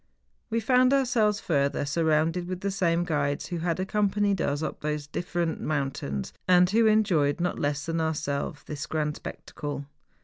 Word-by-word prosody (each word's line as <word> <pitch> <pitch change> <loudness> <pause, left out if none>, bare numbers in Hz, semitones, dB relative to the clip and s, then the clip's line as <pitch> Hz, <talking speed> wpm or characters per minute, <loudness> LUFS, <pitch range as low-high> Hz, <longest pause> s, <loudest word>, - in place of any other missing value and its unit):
We 230 0 +1
found 255 +3 +4
our¬ 275 -1 +4
selves, 215 -4 +2
further, 140 -3 0
surrounded 160 +3 +1
with 185 0 -4
the 200 - -1
same 175 -3 +1
guides 145 -4 -1
who 175 - -4
had 170 +1 -1
accompanied 200 -1 +1
us 145 +2 -1
up - - -4
these 150 -1 -2
different 170 +2 -2
moun¬ 140 -3 0
tains, 70 - -4 0.2
and 180 0 +6
who 225 +1 +4
enjoyed 185 -9 +3
not 175 +1 -1
less 145 0 -1
than 165 0 -1
ourselves 150 -2 -2
this 150 -1 -6
grand 150 -1 -1
spectacle. 145 -1 -6
165 Hz, 170 wpm, -27 LUFS, 145-195 Hz, 0.2 s, and